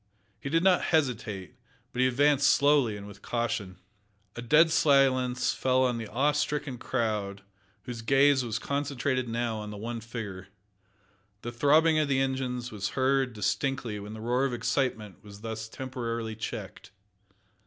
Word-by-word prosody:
He 140 - -5
did 165 +3 +2
not 185 -1 +4
hesitate, 115 - -1 0.4
but 125 - -1
he 130 - +5
advanced 140 +2 +3
slowly 140 -7 +3
and 100 - -9
with 100 -1 -12
caution. 110 -6 -3 0.6
A 120 - -5
dead 155 +7 +5
silence 130 -4 +3
fell 130 0 +2
on 125 -2 0
the 110 - -5
awe 135 +8 +1
stricken 145 -3 -2
crowd, 105 -6 -2 0.4
whose 120 -2 -6
gaze 135 +2 +4
was 115 -2 -2
concentrated 140 -1 -2
now 115 -1 -1
on 105 0 -6
the 105 - -7
one 115 +2 -5
figure. 105 -5 -7 1.0
The 120 - -4
throbbing 155 +6 +4
of 155 - +1
the 135 -1 +1
engines 130 -2 -2
was 100 -2 -3
heard 130 -1 +2
distinctly 115 +1 -2
when 105 +2 -8
the 110 - -8
roar 125 +3 +1
of 135 -2 0
excitement 115 -6 -2
was 100 -1 -12
thus 110 0 -5
temporarily 115 -3 -4
checked. 110 - -7
125 Hz, 155 wpm, -28 LUFS, 110-135 Hz, 1.0 s, he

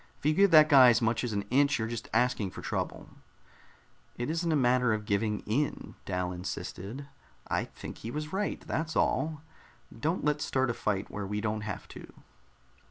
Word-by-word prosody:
"If - - -16
you 155 - +4
give 200 +4 +5
that 155 -3 +8
guy 135 -5 +8
as 120 - +4
much 115 0 0
as 120 - -2
an 100 -1 -1
inch, 140 +2 +4
you're 110 -2 -2
just 115 -1 -6
asking 125 -5 +1
for - - -10
trouble." - - -3 1.1
"It 120 +5 -2
isn't 165 +1 -1
a - - +3
matter 125 -3 +3
of 105 -1 -3
giving 105 0 0
in," 140 +8 -2
Dal 90 0 -1
insisted. 100 +7 -6 0.4
"I - - 0
think - - -10
he 115 - -6
was 150 +5 -5
right, 205 +2 -2
that's 160 0 -3
all. 155 -1 0 0.5
Don't 155 +10 -1
let's 150 0 +1
start 130 -2 +1
a - - -3
fight 105 -3 -2
where 100 -1 -4
we 105 +1 -2
don't 110 0 -2
have 105 -2 -6
to." - - -11
125 Hz, 190 wpm, -29 LUFS, 105-150 Hz, 1.1 s, that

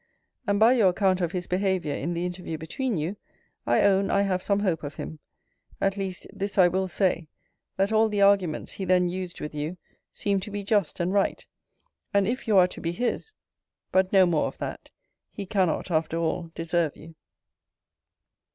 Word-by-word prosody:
And, 200 0 +2
by 225 +3 +7
your 220 -7 +5
account 185 0 +1
of 170 -2 0
his 180 -2 -3
behaviour 185 -4 0
in 170 +5 -3
the 170 +1 -1
interview 180 -2 -4
between 205 - -2
you, 165 +7 -3 0.5
I - - +4
own 195 0 +3
I 200 - +3
have 185 -2 0
some 200 +1 +1
hope 180 -6 0
of 145 0 -6
him. 155 - -7 0.6
At 195 0 +1
least, 190 -2 -4
this 200 0 -4
I 185 -2 +7
will 190 +2 0
say, 180 -3 0 0.5
that 195 +2 +1
all 220 0 +4
the 210 -1 -1
arguments 195 -6 +2
he 195 - -5
then 180 0 +3
used 180 0 -5
with 150 - -6
you, 150 +4 -4 0.3
seemed 200 -1 0
to 200 - -6
be 205 0 -4
just 200 -4 +1
and 175 +2 0
right. 200 -1 +1 0.7
And 200 -1 +4
if 255 +2 -2
you 210 -3 +4
are 180 -1 +7
to - - -8
be 170 0 -2
his 245 - -2 0.6
But 190 0 +3
no 190 -2 +6
more 165 -4 +1
of - - -8
that: - - -6 0.4
he 200 - -7
cannot, 185 -2 0
after 160 0 0
all, 165 +1 -1
deserve 165 -2 -1
you. 160 +1 -12
185 Hz, 190 wpm, -26 LUFS, 170-200 Hz, 0.7 s, by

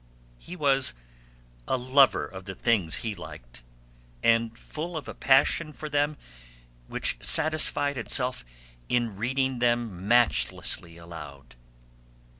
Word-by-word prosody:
He 180 - -9
was 135 - +1 0.7
a - - +1
lover 130 - +4
of 95 +4 -10
the 95 -1 -7
things 100 -9 +1
he 110 - -1
liked, - - -11 0.6
and 115 0 +2
full 165 +2 -6
of 155 - -7
a - - -6
passion 140 +4 +3
for 155 0 -7
them 145 +1 0 0.7
which - - -2
satisfied 145 -3 +2
itself 125 - 0 0.5
in 120 -4 0
reading 130 +4 -1
them 120 -6 0
matchlessly 115 -7 +1
aloud. 75 -7 -11
120 Hz, 115 wpm, -27 LUFS, 95-140 Hz, 0.7 s, lover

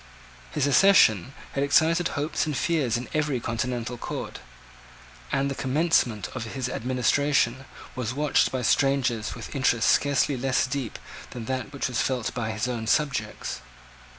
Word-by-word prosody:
His 95 - 0
accession 135 - +5 0.2
had 140 - 0
excited 165 +4 +3
hopes 150 +2 -1
and 150 -4 -2
fears 140 -9 +1
in 120 - -6
every 150 -4 0
continental 120 +1 -3
court: - - -5 0.9
and 135 - +1
the 140 - -2
commencement 130 - +1
of 130 - -5
his 130 -2 -2
administration 130 +1 +1 0.3
was 125 -3 -2
watched 145 +2 +2
by 130 -1 -2
strangers 130 -3 +1
with - - -8
interest 120 -4 +2
scarcely 145 0 +2
less 130 +1 +1
deep 135 -6 -4 0.3
than 120 -2 -7
that 130 +1 -3
which 140 - -2
was 125 -3 -1
felt 125 -4 -1
by 120 -3 -3
his 110 +1 -2
own 115 -3 -3
subjects. 125 -5 -1
130 Hz, 150 wpm, -26 LUFS, 120-140 Hz, 0.9 s, accession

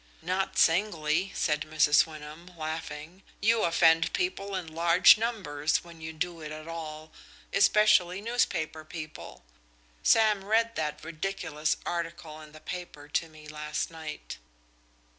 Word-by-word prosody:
"Not 185 +3 -1
singly," 170 -1 +2
said 150 -2 0
Mrs. 155 0 +4
Wyndham, 155 +2 -10
laughing. 155 +2 -6 0.2
"You 225 +1 +3
offend 165 -1 +4
people 200 - -2
in 185 -2 -3
large 170 +2 +7
numbers 185 -10 -1
when 170 -1 -14
you 160 0 -5
do 165 +1 -4
it 155 0 -7
at 155 +1 -8
all, 155 -1 -7 0.4
especially 195 -3 +4
newspaper 190 -9 -1
people. 155 - -9 0.6
Sam 215 -3 +4
read 225 +3 +2
that 150 -3 -3
ridiculous 160 -2 -2
article 165 -2 -4
in 155 -1 -13
the 155 - -13
paper 165 -3 -7
to 165 +2 -1
me 155 -1 -14
last 150 +1 -4
night." 160 - -8
165 Hz, 130 wpm, -28 LUFS, 155-185 Hz, 0.6 s, large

